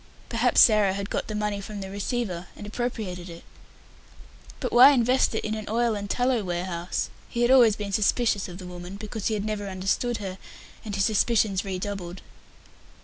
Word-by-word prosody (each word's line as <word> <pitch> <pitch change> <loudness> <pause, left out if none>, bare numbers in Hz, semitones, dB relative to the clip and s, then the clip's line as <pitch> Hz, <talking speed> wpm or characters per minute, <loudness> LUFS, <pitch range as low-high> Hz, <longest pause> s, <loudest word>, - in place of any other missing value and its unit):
Perhaps 240 +1 +4
Sarah 210 -4 +5
had 200 +1 -5
got - - -2
the 215 - -4
money 210 -1 -2
from 205 +1 -7
the 190 -1 -6
receiver 200 -3 -3
and 205 - -9
appropriated 210 -6 -4
it. 170 0 -10 1.2
But 250 - -3
why 250 +3 +9
invest 250 -1 +2
it - - -2
in 215 - -2
an 215 -1 -5
oil 235 +1 +1
and 205 -1 -5
tallow 245 -1 +1
warehouse? 175 -1 -3 0.2
He 240 - -1
had 240 - +3
always 240 -5 +6
been 205 -1 -5
suspicious 210 0 +1
of 175 -1 -9
the 185 - -9
woman, 180 +1 -8
because 215 0 -5
he 220 - 0
had 205 0 -3
never 210 -2 -3
understood 195 +6 -1
her, 190 -2 -6 0.4
and 210 -3 -5
his 195 -1 +2
suspicions 215 -2 +2
redoubled. 190 -2 -5
205 Hz, 185 wpm, -26 LUFS, 190-230 Hz, 1.2 s, why